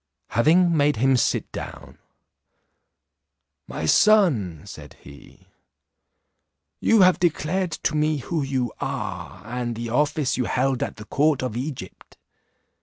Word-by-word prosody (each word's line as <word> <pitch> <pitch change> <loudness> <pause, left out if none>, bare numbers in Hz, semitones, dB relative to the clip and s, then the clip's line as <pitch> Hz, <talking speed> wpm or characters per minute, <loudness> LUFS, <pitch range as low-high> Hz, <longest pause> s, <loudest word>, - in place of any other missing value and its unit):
Having 170 +7 +3
made 145 -1 +2
him 130 +4 +2
sit 120 - 0
down, - - -9 1.7
"My 80 - -5
son," 120 - +3
said - - -11
he, 70 0 -17 1.3
"you 225 -2 +4
have 185 -1 +5
declared 175 +1 -1
to - - 0
me 155 0 +1
who 155 +4 -3
you 130 -3 -2
are, 90 - -5
and 120 0 -4
the 115 +1 -5
office 145 +2 0
you 125 - 0
held 130 +1 0
at - - -3
the 105 - -11
court 145 +4 +1
of 125 -4 -3
Egypt. 125 - -7
135 Hz, 125 wpm, -23 LUFS, 120-155 Hz, 1.7 s, have